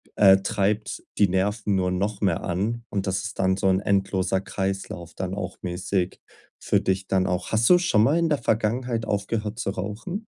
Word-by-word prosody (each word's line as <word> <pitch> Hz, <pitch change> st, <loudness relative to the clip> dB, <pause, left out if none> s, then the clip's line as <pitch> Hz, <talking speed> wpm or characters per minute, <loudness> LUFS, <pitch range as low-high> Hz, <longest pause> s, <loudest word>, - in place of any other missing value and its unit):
äh, 95 Hz, -2 st, +7 dB
treibt 100 Hz, +2 st, -1 dB
die 100 Hz, -, +5 dB
Nerven 100 Hz, +3 st, 0 dB
nur 90 Hz, -1 st, +1 dB
noch 100 Hz, +3 st, -2 dB
mehr 95 Hz, -5 st, +1 dB
an, 105 Hz, +7 st, -2 dB
und 100 Hz, -2 st, -2 dB
das 95 Hz, 0 st, -1 dB
ist 110 Hz, +2 st, -6 dB
dann 95 Hz, 0 st, +2 dB
so 95 Hz, -, +1 dB
'n 95 Hz, 0 st, +3 dB
endloser 95 Hz, -1 st, 0 dB
Kreislauf 95 Hz, -3 st, -4 dB
dann 95 Hz, 0 st, -3 dB
auch 95 Hz, -2 st, -5 dB
mäßig 90 Hz, +1 st, -2 dB, 0.4 s
für -, -, +2 dB
dich 95 Hz, 0 st, -1 dB
dann 95 Hz, -1 st, +1 dB
auch. 90 Hz, 0 st, -2 dB
Hast 110 Hz, +1 st, +3 dB
du 180 Hz, -, +8 dB
schon 140 Hz, -12 st, +3 dB
mal 145 Hz, +8 st, +3 dB
in 170 Hz, -1 st, +2 dB
der 150 Hz, -, +2 dB
Vergangenheit 115 Hz, 0 st, 0 dB
aufgehört 105 Hz, +2 st, -2 dB
zu 100 Hz, -, -1 dB
rauchen? 105 Hz, -, -5 dB
100 Hz, 190 wpm, -25 LUFS, 95-110 Hz, 0.4 s, du